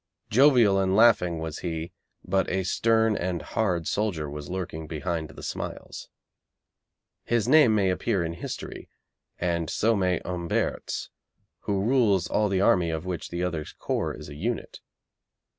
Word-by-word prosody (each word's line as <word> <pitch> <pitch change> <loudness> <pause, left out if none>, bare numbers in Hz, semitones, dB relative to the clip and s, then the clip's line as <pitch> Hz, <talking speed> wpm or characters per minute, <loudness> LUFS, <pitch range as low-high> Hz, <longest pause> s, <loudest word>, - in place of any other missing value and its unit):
Jovial 120 -5 +5
and 95 0 +1
laughing 105 -7 +4
was 80 -1 -5
he, 85 0 -4 0.3
but 95 +1 +1
a 95 +1 0
stern 110 +3 +2
and 90 -2 -2
hard 90 -7 -1
soldier 95 -8 -1
was 75 0 -7
lurking 85 -4 -5
behind 80 0 -3
the 70 - -12
smiles. - - -6 1.1
His 120 -1 0
name 140 -5 +6
may 95 -3 +2
appear 95 0 0
in 85 0 -3
history, 85 - -7 0.5
and 85 -2 -1
so 115 +1 +2
may 90 -3 +1
Humbert's, 85 -1 -2 0.6
who 100 -1 0
rules 110 -7 +3
all 105 -1 +1
the 95 -1 +1
army 90 -3 +3
of 80 +1 -3
which 90 -4 -4
the 85 +1 -3
other's 85 -4 -3
corps - - -2
is - - -9
a 75 - -9
unit. 110 +11 -4
90 Hz, 150 wpm, -26 LUFS, 85-105 Hz, 1.1 s, name